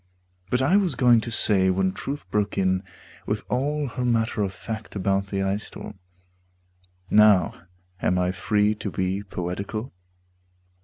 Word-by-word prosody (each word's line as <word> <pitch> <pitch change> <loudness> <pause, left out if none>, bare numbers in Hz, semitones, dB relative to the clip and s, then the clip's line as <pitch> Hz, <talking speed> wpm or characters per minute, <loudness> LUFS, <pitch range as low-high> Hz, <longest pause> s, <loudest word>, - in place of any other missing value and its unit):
But 125 +3 +1
I 180 +9 +4
was 195 -4 +2
going 120 -3 +5
to 120 - -5
say 100 -4 +4
when 95 0 +1
Truth 140 +9 -6
broke 105 -1 0
in 95 -1 +2 0.5
With - - -1
all 145 +3 0
her 125 +1 -4
matter 115 -2 +1
of 100 -2 0
fact 110 +3 -7
about 100 0 0
the 100 0 -2
ice 100 +2 -1
storm 95 - -10 1.1
(Now 105 -4 +4 0.3
am 90 - +1
I 90 0 +1
free 105 +3 +1
to 105 -1 -5
be 95 +3 -2
poetical?) 100 +5 -5
105 Hz, 150 wpm, -24 LUFS, 95-115 Hz, 1.1 s, going